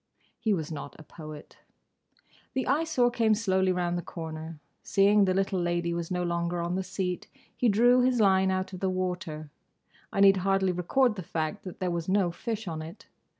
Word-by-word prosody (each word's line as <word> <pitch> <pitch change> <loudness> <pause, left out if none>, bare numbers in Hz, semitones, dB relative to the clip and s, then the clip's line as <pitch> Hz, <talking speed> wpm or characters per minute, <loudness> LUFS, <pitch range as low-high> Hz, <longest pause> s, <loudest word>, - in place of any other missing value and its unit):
He 220 - 0
was 165 -5 -1
not 145 -2 -7
a - - -12
poet. 155 -1 -11 1.0
The 260 - 0
Eyesore 280 -4 +2
came 225 -2 +3
slowly 190 -3 +1
round 175 -1 -1
the - - -3
corner. 160 -1 -7 0.2
Seeing 200 +1 +4
the 185 - +2
little 195 -1 0
lady 175 0 0
was 170 -1 -3
no 180 -1 -1
longer 170 0 -1
on 170 +1 -2
the 190 - 0
seat, 185 -1 -3 0.3
he 245 - +2
drew 245 +4 +5
his 250 -1 +2
line 190 -2 +4
out 185 0 -2
of 185 - -6
the 190 - 0
water—I 180 -1 -5
need 195 -1 +7
hardly 190 0 +1
record 215 +7 +1
the - - -3
fact 160 +3 -3
that 185 - -8
there 185 -1 -1
was 170 0 -3
no 190 -3 +2
fish 220 +3 -5
on 160 -2 -4
it. 165 +5 -10
185 Hz, 190 wpm, -28 LUFS, 170-200 Hz, 1.0 s, need